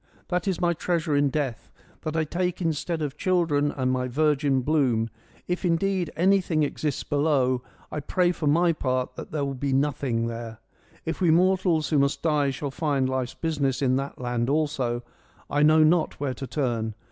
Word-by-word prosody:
That 180 +2 -1
is 190 -3 0
my 175 -1 +2
treasure 165 -2 -1
in 145 0 +3
death: 135 -5 -3 0.3
that 155 +1 -3
I 160 - +2
take 180 +3 -2
instead 165 -1 -1
of 145 0 -4
children 165 -6 +1
and 130 -2 -1
my 125 0 0
virgin 140 0 +2
bloom; 125 -6 +1 0.4
if 180 +2 -2
indeed 180 0 +1
anything 180 -3 +2
exists 145 -1 -2
below. 140 -4 +1 0.3
I - - -3
pray 175 +4 +1
for 165 -4 -3
my 170 +3 +4
part 130 -3 -1
that - - -8
there 150 -2 -1
be 135 +1 -2
nothing 135 -4 0
there: 115 -1 -5 0.5
if 165 +3 -3
we 175 - +4
mortals 180 -1 +3
who 150 - +3
must 140 0 +1
die 150 -3 +2
shall 140 +1 -4
find 140 -3 0
life's 130 -1 -2
business 140 -5 -1
in 130 -2 +2
that 135 +1 -4
land 120 -1 -1
also, 135 -5 0 0.5
I 145 - +2
know 155 +1 +6
not 160 +1 +2
where 140 -2 -1
to 135 +2 -7
turn. 115 -7 -2
145 Hz, 180 wpm, -26 LUFS, 130-165 Hz, 0.5 s, know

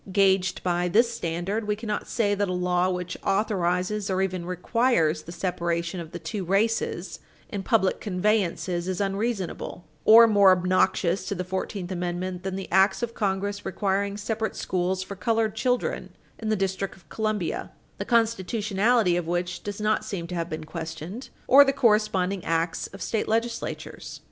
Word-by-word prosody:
Gauged 190 -1 +2
by 175 0 +1
this 230 +6 +3
standard, 195 +3 -2
we 210 - +1
cannot 215 -1 -4
say 205 -4 +1
that 205 -1 0
a - - -1
law 180 0 +1
which 180 -1 -3
authorizes 195 0 0
or 190 -1 0
even 185 -2 -3
requires 180 -3 +1
the 170 - -10
separation 170 0 -2
of 165 -1 -8
the - - -5
two 200 +2 -4
races 205 +5 0 0.3
in 200 - -4
public 195 -1 +1
conveyances 185 -3 0
is 185 0 -2
unreasonable, 195 -3 -2 0.2
or 230 +2 +9
more 205 -3 +6
obnoxious 185 0 +2
to 200 - -2
the 185 - -3
Fourteenth 190 0 -4
Amendment 180 0 -3
than 190 0 -4
the 195 -1 -5
acts 190 +4 +4
of 230 -1 -2
Congress 200 -1 -2
requiring 200 +1 -1
separate 220 +1 -2
schools 185 +1 -1
for 200 +1 -7
colored 220 +2 0
children 250 +2 -1 0.3
in 220 - -3
the 215 - +3
District 195 0 -2
of 175 -4 -22
Columbia, 215 -5 -2 0.3
the - - -1
constitutionality 220 -2 +2
of 175 -2 -2
which 175 +1 -2
does 205 0 -6
not 215 0 +1
seem 175 -4 -4
to 175 - -7
have 170 -1 -2
been 155 -1 -5
questioned, 165 - -7 0.2
or 280 +2 +8
the 275 - +2
corresponding 205 -6 +2
acts 165 0 -1
of 195 - -8
state 220 - -1
legislatures. 230 +2 -3
190 Hz, 165 wpm, -26 LUFS, 180-215 Hz, 0.3 s, or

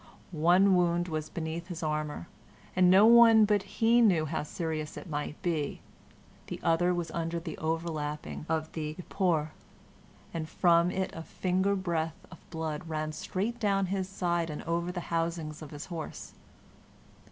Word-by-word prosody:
One 180 +4 +4
wound 175 0 +2
was 155 -1 -3
beneath 165 +1 -4
his 170 -3 -6
armor, 150 - -2 0.5
and 185 -1 +5
no 190 +3 +7
one 230 -1 +8
but 205 -1 +2
he 225 +4 +2
knew 180 -9 +4
how 155 +2 -2
serious 155 -1 -4
it - - -8
might 150 -1 -4
be; 160 -5 -1 0.7
the - - -5
other 170 +2 +3
was 175 -2 -2
under 165 0 -2
the 165 -2 -6
overlapping 155 -2 -3
of 160 -1 -1
the 155 -1 -4
epauhere, 170 -4 0 0.8
and 160 -1 -4
from 170 0 +4
it 190 +1 -2
a 165 - -6
finger's 190 +4 0
breadth 165 -4 -2
of - - -12
blood 160 -1 -4
ran 155 -1 -2
straight 210 +9 -3
down 200 -3 +2
his 190 -1 -2
side 175 -3 -1
and 150 - -5
over 170 +1 -1
the 180 -1 -4
housings 165 -2 -2
of 155 - -8
his 145 +2 -7
horse. 165 -4 -7
170 Hz, 160 wpm, -30 LUFS, 155-185 Hz, 0.8 s, one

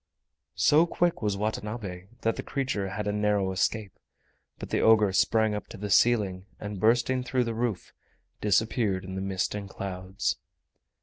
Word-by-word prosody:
So 155 +3 +5
quick 175 0 0
was 105 -2 0
Watanabe 105 -3 -4
that 115 0 +1
the - - -4
creature 125 -8 -2
had 105 +2 -4
a 105 - 0
narrow 105 -2 +1
escape. 100 +1 -1 0.6
But - - -8
the - - +1
ogre 110 -3 +5
sprang 110 +2 +3
up 105 - -4
to - - -10
the 105 0 -5
ceiling, 100 -4 +3
and 105 -2 -5
bursting 120 +4 +2
through 125 0 +1
the 115 -1 -3
roof, 115 -4 -3 0.5
disappeared 105 -2 +1
in 95 - -7
the 95 - -3
mist 95 -1 -1
and 100 -1 -5
clouds. 95 0 -3
105 Hz, 165 wpm, -28 LUFS, 95-115 Hz, 0.6 s, So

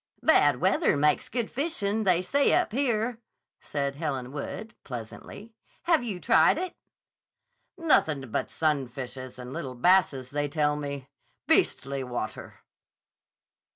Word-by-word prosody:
"Bad - - +5
weather - - +2
makes 150 +1 +2
good 235 -1 -2
fishing, 220 -8 -1
they 180 -1 +3
say 280 +8 +2
up - - +1
here," 235 -2 0 0.4
said 140 -1 -3
Helen 135 -5 -3
Wood, 185 +9 -6
pleasantly. 125 - -9 0.3
"Have 330 -6 +3
you 205 -7 -4
tried 230 +9 +4
it?" 360 0 -3 1.0
"Nothin' 155 - +2
but - - -1
sunfishes 130 -4 -3
and 125 0 -8
little 130 -1 -5
basses, 140 -4 +3
they 145 0 -1
tell 150 0 +1
me. 140 -2 -5 0.4
Beastly 135 0 +1
water!" 125 -1 -6
150 Hz, 120 wpm, -27 LUFS, 135-220 Hz, 1.0 s, Bad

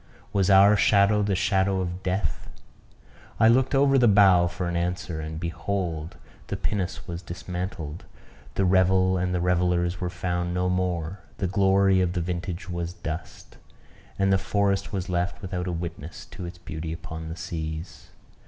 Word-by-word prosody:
Was 100 -2 +2
our 100 +2 +7
shadow 100 0 +4
the 100 -1 +1
shadow 95 0 +1
of 90 0 -3
death? 95 +1 -2 0.9
I 110 - +6
looked 130 +4 +4
over 135 0 +4
the 120 - +5
bow 95 -4 +6
for 90 +1 -4
an 85 - -2
answer; 85 -2 -2
and, 80 0 -5
behold! 85 -2 -3 0.3
the - - -3
pinnace 95 -4 -3
was 85 0 -5
dismantled; 90 -2 -6 0.5
the 95 - +2
revel 95 0 +3
and 90 0 -1
the 90 - 0
revellers 90 0 +1
were 90 - -1
found 90 -1 -2
no 90 0 +1
more; 90 -1 -1 0.2
the 95 - -1
glory 95 0 +3
of 90 -1 0
the 90 - -1
vintage 90 +2 -4
was 85 -1 -4
dust; 80 -1 -7 0.6
and 95 0 +3
the 95 - +3
forest 100 0 0
was 95 -2 -3
left 90 0 -1
without 90 -2 -4
a - - -1
witness 85 -1 -6
to 90 - -7
its 85 +1 -9
beauty 80 -1 -6
upon 80 0 -7
the 80 - -5
seas. 80 -1 -6
90 Hz, 165 wpm, -26 LUFS, 85-95 Hz, 0.9 s, our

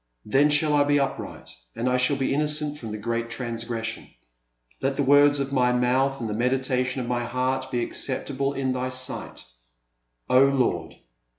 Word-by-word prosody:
Then 135 +7 +3
shall 150 0 +3
I 145 -1 +5
be 145 0 +2
upright 135 - -4 0.2
and 120 - -2
I 125 0 +2
shall 125 +3 +2
be 135 0 0
innocent 150 0 0
from 115 - -7
the 105 - -4
great 115 +2 -3
transgression. 115 -1 -4 0.7
I^t 135 0 0
the 140 - 0
words 145 +1 +5
of 140 0 -3
my 125 -2 +3
mouth 130 +2 +1
and 115 - -3
the 105 - -3
meditation 125 +2 0
of 120 - -5
my 120 -1 -1
heart 130 +2 -1
be 120 -2 -1
acceptable 135 +2 -2
in 135 -1 -1
Thy 130 0 -2
sight, 130 - -4 0.4
— - - -51
O 130 +1 +6
Lord 135 -2 0
130 Hz, 180 wpm, -25 LUFS, 120-140 Hz, 0.7 s, O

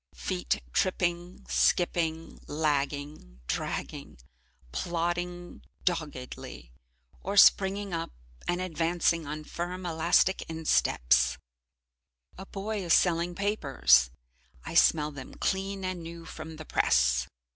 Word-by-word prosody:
Feet 90 -8 -2
tripping, 175 -1 -1
skipping, 165 -2 +1
lagging, 145 - -2
dragging, 70 +3 -4 0.5
plodding 175 - -3 0.2
doggedly, 145 - -4 0.5
or 200 +2 -3
springing 195 -1 +5
up 165 0 -3 0.4
and 175 0 0
advancing 170 -2 0
on 155 +1 -5
firm 180 +3 -5
elastic 170 +3 +2
insteps. 65 - +2 1.0
A 190 +1 -10
boy 205 +1 -4
is 170 - +4
selling 175 0 +2
papers, 135 - +3 0.6
I - - -6
smell 150 -2 +4
them 135 -3 -10
clean 195 0 -2
and 185 -2 -3
new 165 0 -9
from 160 0 -8
the 155 0 -9
press. 60 - +2
165 Hz, 105 wpm, -29 LUFS, 145-180 Hz, 1.0 s, springing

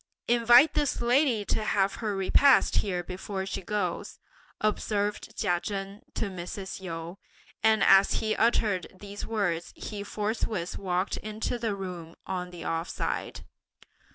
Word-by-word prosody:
"Invite 240 +5 +6
this 290 -2 0
lady 240 -3 +2
to 215 - 0
have 195 -2 +2
her 210 -3 -1
repast 250 +8 +4
here 180 -4 0
before 190 +2 -5
she 195 - -4
goes," 185 -2 -3 0.4
observed 210 0 -1
Chia 175 -4 +1
Chen 195 +1 -5
to - - 0
Mrs. 190 +1 -6
Yu; 170 +1 -6 0.4
and 220 -2 +4
as 195 0 +6
he 215 -1 0
uttered 215 -5 +2
these 205 0 -7
words 180 -7 -1
he 210 -2 -6
forthwith 210 -3 -2
walked 185 0 -1
into 215 +3 -3
the 225 -3 -1
room 180 -4 -7
on 180 -1 -3
the 175 -1 -9
off 165 +1 -2
side. - - -3
200 Hz, 140 wpm, -28 LUFS, 185-220 Hz, 0.4 s, Invite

